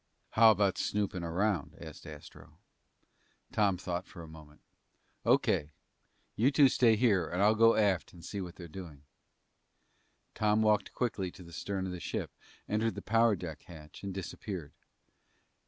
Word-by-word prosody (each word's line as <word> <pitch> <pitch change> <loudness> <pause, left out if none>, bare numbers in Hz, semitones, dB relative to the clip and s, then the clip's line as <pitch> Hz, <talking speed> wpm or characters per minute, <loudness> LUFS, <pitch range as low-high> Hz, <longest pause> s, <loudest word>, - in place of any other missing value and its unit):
"How 115 0 +7
about 100 -2 +2
snooping 100 -4 -1
around?" 90 0 -1
asked - - -10
Astro. 75 -2 -12 0.9
Tom 100 -3 +2
thought 90 0 -5
a 85 -2 -8
moment. 75 -1 -14 0.7
"O.K. 75 +1 +2 0.6
You 120 +5 +3
two 140 -1 +5
stay 115 -3 +4
here. 105 -7 +2
I'll 100 +5 +3
go 115 +1 +5
aft 100 -5 +1
and 85 -2 -13
see 100 - -4
what 90 -1 -7
they're 85 - -9
doing." 80 -4 -10 1.3
Tom 105 +1 +2
walked 105 -2 +1
quickly 105 -7 -1
to 90 - -13
the 85 0 -13
stern 95 +1 -3
of 95 - -4
the 90 - -6
ship, - - -4 0.4
entered 110 +2 0
the - - -7
power 115 -1 +3
deck 85 -4 -7
hatch, 75 -3 -12
and 100 - -4
disappeared. 95 -3 -6
95 Hz, 150 wpm, -31 LUFS, 85-110 Hz, 1.3 s, How